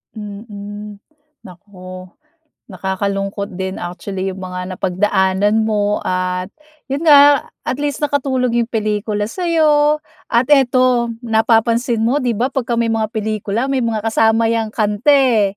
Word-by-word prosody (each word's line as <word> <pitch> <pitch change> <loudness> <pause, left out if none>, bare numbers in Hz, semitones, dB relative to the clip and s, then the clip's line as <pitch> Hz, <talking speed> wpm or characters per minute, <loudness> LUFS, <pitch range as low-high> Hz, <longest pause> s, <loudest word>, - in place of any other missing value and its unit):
Mhm. 205 -1 -8 0.4
Naku, 185 0 -11 0.6
nakakalungkot 195 +1 -3
din 190 +1 -4
actually 185 +2 -5
yung 190 0 -7
mga 180 0 -5
napagdaanan 190 +3 +1
mo 210 -1 0
at 185 +1 -2 0.4
yun 275 - -1
nga 285 -1 +7 0.2
at 255 - -2
least 290 0 -2
nakatulong 265 -4 0
yung 230 - -2
pelikula 210 -1 -1
sa'yo, 305 - +2 0.3
at 235 +2 +2
eto, 255 -3 +3 0.2
napapansin 230 +1 +1
mo 250 +6 +2
'di 245 -3 0
ba 255 +3 0
pagka 240 -3 -1
may 230 -1 0
mga 220 -1 0
pelikula 220 +3 -2
may 270 - +1
mga 225 -3 -2
kasama 225 0 +2
'yang 225 -1 0
kanta 210 +4 0
eh. 250 -6 +3
220 Hz, 130 wpm, -17 LUFS, 200-245 Hz, 0.6 s, nga